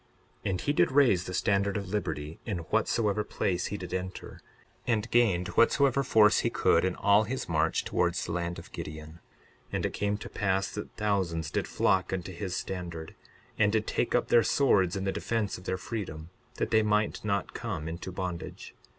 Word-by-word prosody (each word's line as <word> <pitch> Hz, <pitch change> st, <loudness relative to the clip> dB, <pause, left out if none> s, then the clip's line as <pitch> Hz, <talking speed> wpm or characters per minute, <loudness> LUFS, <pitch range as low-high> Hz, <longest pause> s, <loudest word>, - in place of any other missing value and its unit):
62:4 -, -, +1 dB
And 90 Hz, -1 st, -1 dB
he 145 Hz, -, 0 dB
did -, -, +3 dB
raise 130 Hz, -10 st, +4 dB
the 90 Hz, -, -5 dB
standard 100 Hz, 0 st, +1 dB
of 100 Hz, -2 st, -5 dB
liberty 80 Hz, -6 st, -3 dB
in 105 Hz, -5 st, -3 dB, 0.2 s
whatsoever 105 Hz, -1 st, +2 dB
place 95 Hz, -4 st, -1 dB
he 105 Hz, -, -4 dB
did 90 Hz, -3 st, -7 dB
enter, 95 Hz, 0 st, -5 dB, 0.5 s
and 115 Hz, -2 st, +1 dB
gained 100 Hz, -7 st, +3 dB
whatsoever 140 Hz, +2 st, +3 dB
force 110 Hz, -5 st, +5 dB
he -, -, +1 dB
could -, -, +3 dB
in 95 Hz, -1 st, 0 dB
all 100 Hz, +2 st, +4 dB
his 130 Hz, +5 st, -3 dB
march -, -, +1 dB
towards -, -, 0 dB
the -, -, -5 dB
land 85 Hz, 0 st, -2 dB
of -, -, -11 dB
Gideon. 75 Hz, +2 st, -8 dB, 0.5 s
62:5 -, -, -26 dB
And -, -, 0 dB
it -, -, -2 dB
came 105 Hz, 0 st, -1 dB
to -, -, -8 dB
pass 95 Hz, -1 st, 0 dB
that 105 Hz, -, -6 dB
thousands 95 Hz, -7 st, 0 dB
did -, -, -1 dB
flock 95 Hz, -1 st, +1 dB
unto 95 Hz, 0 st, -3 dB
his 90 Hz, +1 st, -4 dB
standard, 85 Hz, -4 st, -5 dB, 0.5 s
and 105 Hz, 0 st, +4 dB
did 110 Hz, 0 st, +1 dB
take 120 Hz, -, 0 dB
up 120 Hz, -, +1 dB
their 120 Hz, -, +6 dB
swords 100 Hz, -10 st, +3 dB
in 95 Hz, -, -2 dB
the 95 Hz, -, 0 dB
defence 110 Hz, -1 st, -2 dB
of 90 Hz, -, -16 dB
their 95 Hz, -, -1 dB
freedom, 90 Hz, -6 st, -6 dB, 0.2 s
that -, -, -2 dB
they 110 Hz, -, +5 dB
might 105 Hz, 0 st, +1 dB
not 100 Hz, -1 st, -1 dB
come 100 Hz, -10 st, -4 dB
into 85 Hz, +3 st, -5 dB
bondage. 90 Hz, -2 st, -5 dB
100 Hz, 195 wpm, -29 LUFS, 90-105 Hz, 0.5 s, their